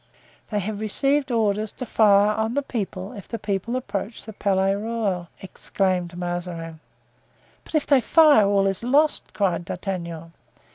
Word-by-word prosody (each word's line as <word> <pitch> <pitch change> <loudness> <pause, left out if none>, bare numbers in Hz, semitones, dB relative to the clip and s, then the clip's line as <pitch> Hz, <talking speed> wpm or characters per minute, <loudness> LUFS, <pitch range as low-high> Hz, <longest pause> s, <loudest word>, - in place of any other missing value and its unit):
"They 210 - -2
have 205 +1 -4
received 275 +7 0
orders 215 -3 0
to 255 - -6
fire 205 -2 +4
on 220 +3 -1
the 285 - 0
people 200 -6 -4
if 200 -5 -10
the 230 - -4
people 205 +3 -2
approach 225 -3 -4
the 220 - -8
Palais 195 -1 +1
Royal!" 205 -4 -2 0.2
exclaimed 185 -2 -2
Mazarin. 175 -2 -5 0.8
"But - - -8
if 305 - +2
they 275 -3 +4
fire, 295 -8 +6
all 200 -1 +3
is 195 -1 -1
lost!" 290 +5 +2
cried 190 -4 0
D'Artagnan. 170 -2 -5
205 Hz, 150 wpm, -23 LUFS, 185-230 Hz, 0.8 s, fire